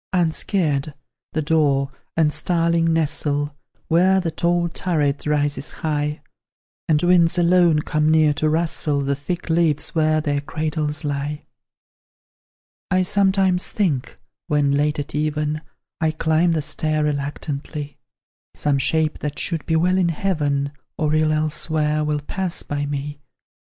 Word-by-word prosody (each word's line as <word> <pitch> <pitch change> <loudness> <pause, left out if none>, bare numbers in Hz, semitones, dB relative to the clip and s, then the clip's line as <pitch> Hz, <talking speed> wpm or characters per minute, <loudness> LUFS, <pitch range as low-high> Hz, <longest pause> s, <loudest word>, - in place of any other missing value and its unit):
Unscared, 160 -4 0 0.4
the 155 - -1
daw 145 -4 +2 0.3
and 155 -2 +3
starling 165 +1 +2
nestle, 145 -2 -1 0.3
Where 185 +3 +4
the 170 -3 -2
tall 170 +2 +1
turret 155 -5 -1
rises 145 -1 0 0.2
high, 150 -1 -1 0.7
And 150 0 +3
winds 175 -1 +4
alone 175 -3 +4
come 155 0 +1
near 155 -1 +4
to 155 +1 0
rustle 155 -2 0
The 140 0 0
thick 175 +5 -5
leaves 160 -3 +1
where 155 -1 +2
their 145 -2 -1
cradles 150 0 -3
lie, 145 +1 -3 1.4
I 185 0 +3
sometimes 190 -1 +2
think, 160 -12 -1 0.3
when 145 -2 +2
late 150 +2 +1
at 145 - -4
even 150 0 -1 0.4
I 160 -2 +2
climb 160 +2 +2
the 155 -2 -1
stair 155 +1 -1
reluctantly, 145 0 -4 0.6
Some 145 -2 +1
shape 155 +3 +1
that 150 -1 -4
should 165 -4 -1
be 165 - +1
well 180 +3 +3
in 175 -2 +2
heaven, 150 -5 -1 0.3
Or 155 -1 0
ill 155 0 +3
elsewhere, 155 0 0
will 150 -1 -1
pass 180 +4 -3
by 145 0 -3
me. 145 +1 -4
155 Hz, 135 wpm, -21 LUFS, 145-165 Hz, 1.4 s, Where